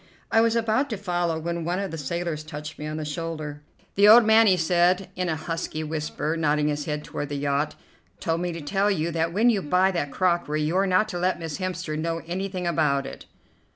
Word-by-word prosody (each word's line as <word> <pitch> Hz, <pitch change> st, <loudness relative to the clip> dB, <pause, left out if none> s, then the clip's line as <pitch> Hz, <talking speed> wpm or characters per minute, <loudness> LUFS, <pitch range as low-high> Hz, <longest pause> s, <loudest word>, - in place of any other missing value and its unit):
I 225 Hz, -, +5 dB
was 230 Hz, 0 st, +2 dB
about 230 Hz, +5 st, +1 dB
to 220 Hz, -, -3 dB
follow 175 Hz, -4 st, -1 dB
when 170 Hz, +1 st, -3 dB
one 175 Hz, +2 st, -1 dB
of 195 Hz, -2 st, -3 dB
the 165 Hz, -, -5 dB
sailors 165 Hz, +1 st, -3 dB
touched 150 Hz, 0 st, -8 dB
me 150 Hz, -, -5 dB
on 155 Hz, 0 st, -4 dB
the 155 Hz, -, -4 dB
shoulder. 150 Hz, -1 st, -5 dB, 0.3 s
"The 200 Hz, +1 st, +5 dB
old 225 Hz, +2 st, +9 dB
man," 220 Hz, +1 st, +6 dB
he 185 Hz, -2 st, +5 dB
said 180 Hz, +3 st, +2 dB
in 180 Hz, -1 st, -1 dB
a 160 Hz, -, 0 dB
husky 155 Hz, -1 st, -4 dB
whisper, 155 Hz, 0 st, -3 dB
nodding 150 Hz, -2 st, +1 dB
his 145 Hz, 0 st, -2 dB
head 150 Hz, -1 st, -3 dB
toward 145 Hz, -, -5 dB
the 145 Hz, -, -3 dB
yacht, 140 Hz, +1 st, -1 dB, 0.4 s
"told 165 Hz, 0 st, -1 dB
me 180 Hz, 0 st, -1 dB
to 170 Hz, -1 st, -6 dB
tell 195 Hz, +7 st, +1 dB
you 170 Hz, -4 st, 0 dB
that 165 Hz, 0 st, 0 dB
when 225 Hz, +7 st, +4 dB
you 205 Hz, -4 st, 0 dB
buy 185 Hz, +4 st, +2 dB
that 170 Hz, -6 st, -2 dB
crockery 170 Hz, -4 st, 0 dB
you're 185 Hz, +6 st, +1 dB
not 185 Hz, +3 st, +3 dB
to 175 Hz, -4 st, -4 dB
let 185 Hz, +1 st, +1 dB
Miss 160 Hz, -3 st, -5 dB
Hemster 185 Hz, -4 st, -3 dB
know 165 Hz, +1 st, -2 dB
anything 185 Hz, +1 st, -3 dB
about 150 Hz, -5 st, +1 dB
it." -, -, -9 dB
170 Hz, 220 wpm, -25 LUFS, 155-185 Hz, 0.4 s, old